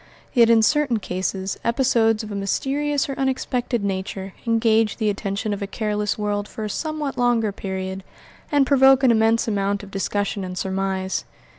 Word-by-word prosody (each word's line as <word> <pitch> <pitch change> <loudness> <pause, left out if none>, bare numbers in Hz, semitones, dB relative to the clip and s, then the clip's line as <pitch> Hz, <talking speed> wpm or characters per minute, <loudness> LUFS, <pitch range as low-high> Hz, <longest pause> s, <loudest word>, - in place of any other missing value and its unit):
Yet 235 -3 +5
in 225 -1 +5
certain 295 -2 +2
cases 190 0 -3
episodes 230 -2 +2
of 215 - -7
a - - -4
mysterious 275 +8 -1
or 275 - -3
unexpected 255 -3 -1
nature 190 0 -3
engage 225 -2 +2
the 215 -3 +1
attention 200 +1 -3
of 205 - -5
a 200 - -2
careless 210 -1 -2
world 205 -1 -2
for 220 - -7
a 210 - -3
somewhat 310 -2 -3
longer 235 -3 +2
period, 190 -1 -5 0.5
and 285 -2 +4
provoke 270 -1 +5
an 255 - +6
immense 225 +1 +3
amount 200 -1 -1
of 200 - -11
discussion 200 +1 -2
and 185 0 -6
surmise. 190 0 -2
215 Hz, 165 wpm, -22 LUFS, 195-245 Hz, 0.5 s, an